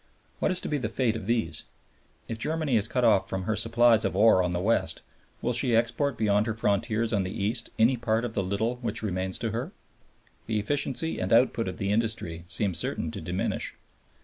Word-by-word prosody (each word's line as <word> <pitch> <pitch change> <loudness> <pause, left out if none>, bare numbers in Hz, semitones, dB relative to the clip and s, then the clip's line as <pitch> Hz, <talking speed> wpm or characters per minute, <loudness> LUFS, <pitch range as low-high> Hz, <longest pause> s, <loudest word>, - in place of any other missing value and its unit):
What - - +1
is 185 -1 +3
to - - -3
be 150 - -1
the 110 -4 -2
fate 115 -1 0
of 105 - -6
these? 110 -10 0 0.6
If 115 - -5
Germany 155 0 0
is 110 -1 +2
cut 125 +1 -1
off 100 -5 +4
from 95 -1 -3
her 110 +3 -1
supplies 115 +1 +4
of - - -1
ore 105 -3 +6
on 90 -1 0
the 90 - -1
west, 110 +5 0 0.4
will 125 - +1
she 120 0 +3
export 120 +3 +1
beyond 105 0 +2
her 110 - -2
frontiers 110 +2 0
on 100 - +2
the 95 - -3
east 110 +4 -2
any 120 +3 +4
part 115 0 0
of 115 - -5
the 100 - 0
little 100 +6 -1
which 115 -3 -3
remains 95 -2 -2
to 115 -2 -3
her? 125 - -4 0.8
The 110 - 0
efficiency 140 +7 0
and 95 - -2
output 115 -1 +3
of 90 0 -5
the 100 0 -1
industry 105 -7 -2
seem 100 0 -1
certain 80 0 -2
to - - -7
diminish. - - -3
110 Hz, 210 wpm, -27 LUFS, 100-120 Hz, 0.8 s, ore